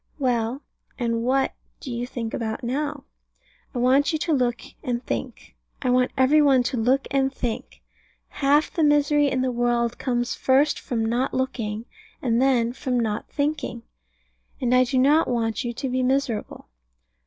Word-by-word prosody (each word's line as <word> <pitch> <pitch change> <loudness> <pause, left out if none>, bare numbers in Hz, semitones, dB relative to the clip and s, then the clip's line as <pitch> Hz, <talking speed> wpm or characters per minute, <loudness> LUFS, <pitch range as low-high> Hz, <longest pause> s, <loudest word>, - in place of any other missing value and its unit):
Well, 250 -1 -1 0.3
and 230 -2 -1
what 265 +3 +1 0.3
do 260 - -7
you 240 +1 -3
think 230 -3 -5
about 225 +2 -3
it - - -3
now? 285 +3 -2 0.7
I - - -2
want 260 +5 +3
you 315 - 0
to 325 +1 -1
look 245 -3 +1 0.2
and 245 0 -2
think. - - -5 0.3
I 250 - +2
want 250 0 +3
every 270 +4 +5
one 270 -4 +4
to 250 - -2
look 255 +4 +2
and 270 -1 +2
think. 240 -4 -5 0.5
Half 290 +2 +2
the 330 - -1
misery 295 -1 +4
in 260 -1 0
the 260 - 0
world 240 -1 0
comes 245 -2 -1
first 275 +3 +2
from 225 -3 -2
not 240 +4 0
looking, 230 -4 -2 0.3
and 235 -1 +1
then 245 -3 +2
from 255 -1 -1
not 220 -2 -2
thinking. 285 -5 -2 0.8
And 250 -1 +1
I 255 0 +5
do 260 +1 -1
not 290 +5 +4
want 230 0 -1
you 240 - -2
to 270 +3 -4
be 255 0 0
miserable. 255 -3 -1
255 Hz, 170 wpm, -24 LUFS, 240-275 Hz, 0.8 s, every